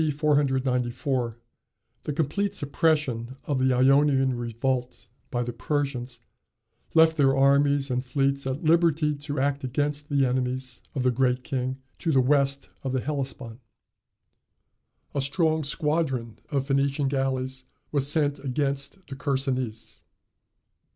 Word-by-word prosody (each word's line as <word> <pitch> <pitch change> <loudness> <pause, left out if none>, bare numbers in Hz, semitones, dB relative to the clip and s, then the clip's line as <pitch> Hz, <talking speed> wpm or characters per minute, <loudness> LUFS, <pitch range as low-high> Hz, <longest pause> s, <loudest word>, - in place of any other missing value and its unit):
494, 130 -4 0 0.7
the - - -1
complete 170 +7 -1
suppression 140 - 0
of 140 -3 0
the 130 0 +3
Ionian 135 +1 +4
revolt 120 0 -3 0.2
by 120 -1 -1
the 120 0 -4
Persians 125 -2 -2 0.7
left 160 0 +6
their 135 -2 +4
armies 140 0 +3
and 125 0 0
fleets 135 +1 0
at 135 +4 -3
liberty 160 -2 +3
to 145 -1 -4
act 140 +1 0
against 145 +3 -2
the 140 -2 +3
enemies 130 0 -2
of 130 - 0
the 125 - +3
Great 125 0 +1
King 130 0 -2 0.2
to 165 - 0
the 135 - +4
west 140 +1 +2
of 130 -1 -2
the 130 - +1
Hellespont. 135 -5 -4 1.5
A 140 - 0
strong 160 +2 +1
squadron 140 -6 -1
of 135 -2 0
Phoenician 140 0 +1
galleys 130 -1 -1 0.3
was 140 -1 +2
sent 145 -2 +1
against 140 +6 -2
the 135 - -8
Chersonese. 130 -4 -2
135 Hz, 125 wpm, -26 LUFS, 130-145 Hz, 1.5 s, left